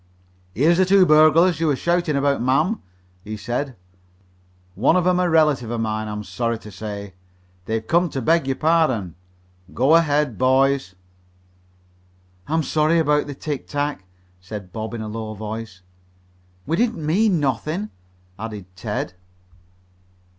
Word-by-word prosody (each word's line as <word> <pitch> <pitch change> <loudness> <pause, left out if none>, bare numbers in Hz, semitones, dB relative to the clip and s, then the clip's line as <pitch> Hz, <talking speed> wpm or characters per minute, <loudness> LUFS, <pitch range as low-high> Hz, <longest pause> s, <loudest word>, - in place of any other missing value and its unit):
"Here's 165 - +3
the 190 0 +5
burglars 155 +2 +5
you 165 - +1
were 145 - +2
shouting 170 +1 0
about, 140 -1 +1
ma'am," 155 - +1 0.4
he 110 0 -6
said. 120 +6 -3 1.0
"One 105 - +2
of 180 -1 +2
'em 180 0 +3
a 180 -1 +2
relative 150 -7 +2
of 120 0 -3
mine, 110 -1 -2
I'm 105 0 -5
sorry 115 +5 -2
to 105 -1 -12
say. 100 -1 -7 0.5
They've 110 +1 -2
come 170 +4 +2
to 135 - -4
beg 160 +3 +2
your 135 - 0
pardon. 155 - +1 0.6
Go 135 +6 +3
ahead, 150 -6 +2
boys." 130 -6 +2 1.5
"I'm 160 +1 0
sorry 155 +3 +2
about 150 -2 +2
the 145 - -6
tic 145 0 -5
tac," 145 -9 -3 0.3
said 95 -1 -9
Bob 110 +1 -5
in 115 - -5
a 110 - -5
low 110 0 -5
voice. 105 -3 -7 0.8
"We 165 +4 -1
didn't 225 -9 0
mean 185 +3 +2
nothin'," 155 - -2 0.5
added 105 -3 -6
Ted. 90 0 -4
140 Hz, 140 wpm, -22 LUFS, 110-160 Hz, 1.5 s, the